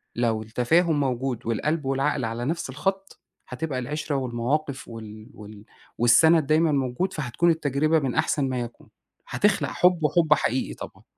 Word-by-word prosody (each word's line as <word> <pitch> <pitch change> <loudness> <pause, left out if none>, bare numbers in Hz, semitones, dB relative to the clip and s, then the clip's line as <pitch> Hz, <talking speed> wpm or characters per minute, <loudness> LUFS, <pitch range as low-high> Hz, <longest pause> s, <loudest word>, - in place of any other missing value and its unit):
لو 115 -2 0
التفاهم 145 +9 +1
موجود، 130 -2 -2
والقلب 150 +7 -1
والعقل 135 0 0
على 115 +2 -4
نَفْس 165 +1 -3
الخط، 195 +8 -3 0.3
هتبقى 130 +1 -3
العِشرة 145 +3 -3
والمواقف 130 +2 -2
وال 110 +1 -10
وال 105 0 -12 0.3
والسند 155 +7 +5
دايمًا 155 +1 +3
موجود، 140 +7 -1
فهتكون 150 +4 0
التجربة 155 0 +1
من 135 -4 -2
أحسن 140 -3 +1
ما 130 -1 -2
يكون، 120 -1 -8 0.4
هتخلق - - +1
حُب 180 -2 +2
وحُب 155 0 +4
حقيقي 130 -3 -1
طبعًا. - - -10
135 Hz, 145 wpm, -25 LUFS, 120-155 Hz, 0.4 s, والسند